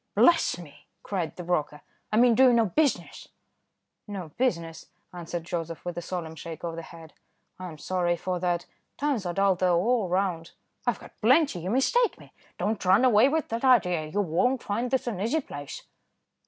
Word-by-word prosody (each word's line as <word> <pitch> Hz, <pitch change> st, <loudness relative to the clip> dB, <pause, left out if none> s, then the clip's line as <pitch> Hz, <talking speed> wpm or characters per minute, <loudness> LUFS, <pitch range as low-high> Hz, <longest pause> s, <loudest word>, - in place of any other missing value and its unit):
"Bless 335 Hz, -, +4 dB
me!" 170 Hz, -5 st, -13 dB, 0.2 s
cried 180 Hz, -6 st, -3 dB
the 180 Hz, -, -7 dB
broker, 155 Hz, -4 st, -1 dB, 0.3 s
"I 215 Hz, -, +1 dB
mean 240 Hz, 0 st, +6 dB
do 260 Hz, +4 st, +6 dB
you 250 Hz, -, +6 dB
know 230 Hz, -1 st, +4 dB
business?" 285 Hz, -, -1 dB, 0.8 s
"No 190 Hz, -5 st, -6 dB
business," 170 Hz, -, -2 dB, 0.3 s
answered 175 Hz, -1 st, -5 dB
Joseph, 165 Hz, -1 st, -5 dB
with 175 Hz, -1 st, -4 dB
a 175 Hz, -, -4 dB
solemn 170 Hz, -2 st, -5 dB
shake 160 Hz, +1 st, -9 dB
of 165 Hz, -1 st, -3 dB
the 165 Hz, -, -5 dB
head; 165 Hz, -1 st, -13 dB, 0.5 s
"I 185 Hz, -, -6 dB
am 160 Hz, -3 st, -9 dB
sorry 175 Hz, +2 st, 0 dB
for 180 Hz, +1 st, -3 dB
that; 175 Hz, -1 st, -1 dB, 0.3 s
times 270 Hz, -10 st, -1 dB
are 175 Hz, -, -2 dB
dull 195 Hz, 0 st, +4 dB
though, 180 Hz, -1 st, +2 dB
all 220 Hz, -1 st, +1 dB
round." 180 Hz, -3 st, -1 dB, 0.3 s
"I've 240 Hz, -, +1 dB
got -, -, -16 dB
plenty, 260 Hz, -, +4 dB
you 175 Hz, +3 st, -4 dB
mistake 435 Hz, -, +2 dB
me, -, -, -16 dB, 0.2 s
don't 215 Hz, 0 st, -1 dB
run 195 Hz, +7 st, +5 dB
away 240 Hz, +1 st, +5 dB
with 315 Hz, +1 st, -1 dB
that 230 Hz, +2 st, -3 dB
idea, 180 Hz, -11 st, +3 dB
you 200 Hz, +7 st, -1 dB
won't 235 Hz, +9 st, +1 dB
find 230 Hz, +5 st, -2 dB
this 265 Hz, 0 st, 0 dB
an 215 Hz, -6 st, -3 dB
easy 235 Hz, +10 st, +1 dB
place." 145 Hz, -, -8 dB
185 Hz, 190 wpm, -27 LUFS, 170-240 Hz, 0.8 s, mean